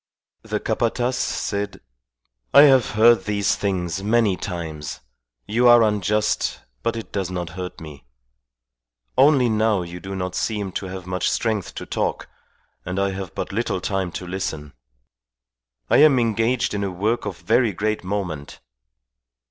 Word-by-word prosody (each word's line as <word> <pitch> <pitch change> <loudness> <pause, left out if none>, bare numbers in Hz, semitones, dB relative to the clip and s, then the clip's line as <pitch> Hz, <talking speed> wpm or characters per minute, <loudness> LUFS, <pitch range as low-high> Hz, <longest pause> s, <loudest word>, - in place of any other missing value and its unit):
The - - -3
Capataz 120 +2 0
said, 100 -4 -2 0.8
"I 140 - +11
have 135 -4 +5
heard 115 +2 +5
these 100 -2 +1
things 95 -2 -2
many 110 -2 +3
times. 80 -7 -6 0.5
You 120 +3 +2
are 120 -1 +8
unjust, 105 0 0 0.2
but 115 - -1
it 115 - -7
does 95 -3 -2
not 90 -3 -4
hurt 90 +1 -7
me. 75 -5 -11 1.1
Only 135 -2 +5
now 110 -3 +1
you 85 +1 -8
do 95 +2 -6
not 90 -1 -3
seem 105 -1 -2
to 95 - -4
have 95 -1 -7
much 90 0 -1
strength 110 -4 -1
to - - -6
talk, - - -2 0.6
and 90 +1 -4
I 100 0 +1
have 95 -3 -6
but - - -4
little 105 -2 -1
time 95 -1 -2
to 90 - -5
listen. 80 -5 -4 1.1
I - - +4
am 145 -3 +6
engaged 115 +1 +1
in 100 -1 -1
a 100 - -1
work 105 +6 -1
of - - -5
very 115 0 +2
great 105 +2 -2
moment." 90 -7 -4
100 Hz, 150 wpm, -22 LUFS, 90-115 Hz, 1.1 s, I